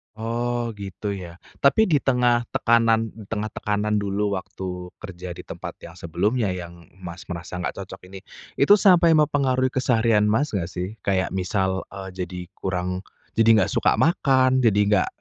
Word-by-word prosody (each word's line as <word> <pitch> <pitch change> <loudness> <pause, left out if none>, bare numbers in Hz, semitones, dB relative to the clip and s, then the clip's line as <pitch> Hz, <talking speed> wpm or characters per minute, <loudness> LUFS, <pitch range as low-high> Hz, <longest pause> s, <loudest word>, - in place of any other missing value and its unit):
Oh 120 +1 -2
gitu 100 +1 -5
ya? 90 -4 -7 0.2
Tapi 140 +10 +4
di 145 - +4
tengah 120 -3 +2
tekanan 115 -1 +2
di 110 -3 -13
tengah 110 0 -3
tekanan 105 0 -1
dulu 100 0 -1
waktu 90 -1 -7
kerja 90 -3 -8
di - - -9
tempat - - -8
yang 85 - -9
sebelumnya 100 +5 0
yang 85 -1 -9 0.2
Mas 85 0 -8
merasa 90 +1 -6
nggak 90 - -3
cocok 95 - -11
ini, 95 +1 -10 0.4
itu 140 +9 +5
sampai 175 -4 +6
mempengaruhi 140 -4 +2
keseharian 115 -4 +2
Mas 110 +5 +1
nggak 90 -2 -2
sih? 90 +4 -5
Kayak 95 -1 0
misal, 95 0 -1
eee, 95 -1 -7
jadi 90 0 -7 0.2
kurang, 90 0 -3 0.3
jadi 115 -1 +5
nggak 95 - +1
suka - - +2
makan 130 -6 +3
jadi 105 -3 +4
nggak 105 -2 +3
105 Hz, 160 wpm, -23 LUFS, 95-120 Hz, 0.4 s, sampai